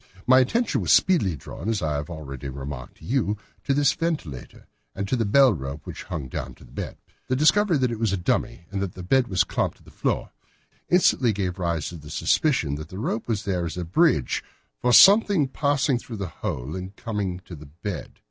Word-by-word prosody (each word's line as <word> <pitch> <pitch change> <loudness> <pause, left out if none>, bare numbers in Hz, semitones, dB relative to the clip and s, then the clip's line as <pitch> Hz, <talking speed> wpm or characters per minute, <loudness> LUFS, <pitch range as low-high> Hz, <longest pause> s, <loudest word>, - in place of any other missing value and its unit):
My 130 +1 +7
attention 230 - +1
was - - +1
speedily 155 - +4
drawn, 85 +8 -7
as 110 -6 -1
I 75 -1 0
have 75 +2 -3
already 70 -5 -7
remarked 65 -1 -7
to - - -14
you, 110 -5 0 0.3
to - - 0
this 145 0 +3
ventilator, 150 - -4 0.3
and 100 0 -3
to 130 - +1
the 115 -3 0
bell 130 +4 +5
rope 70 -2 -6
which - - -8
hung 70 -4 -5
down 65 0 -5
to - - -17
the - - -17
bed. - - -6 0.3
The 130 - +1
discovery 160 +5 +4
that 130 -2 +1
this 115 -2 -4
was 115 -3 +1
a 100 - 0
dummy, 85 0 -1
and 100 -1 -2
that 95 -3 -3
the 90 - -8
bed 125 +7 +3
was 90 -4 +2
clamped - - -2
to - - -23
the - - -16
floor, - - -2 0.6
instantly 135 -9 +4
gave 95 -2 -3
rise 85 -4 -1
to 85 - -8
the 75 -1 -12
suspicion 85 - +1
that 75 +1 -8
the 95 - -8
rope 110 +1 -2
was 110 -3 -2
there 90 -3 -1
as 85 +1 -4
a 90 - -3
bridge 85 - +2 0.4
for 125 - +2
something 200 - +7
passing 140 -1 +1
through 115 -2 -8
the 100 - -3
hole 70 -1 -4
and 95 +2 -7
coming 100 -6 -3
to 90 - -10
the 75 -1 -12
bed. 85 +6 -7
100 Hz, 220 wpm, -25 LUFS, 80-130 Hz, 0.6 s, My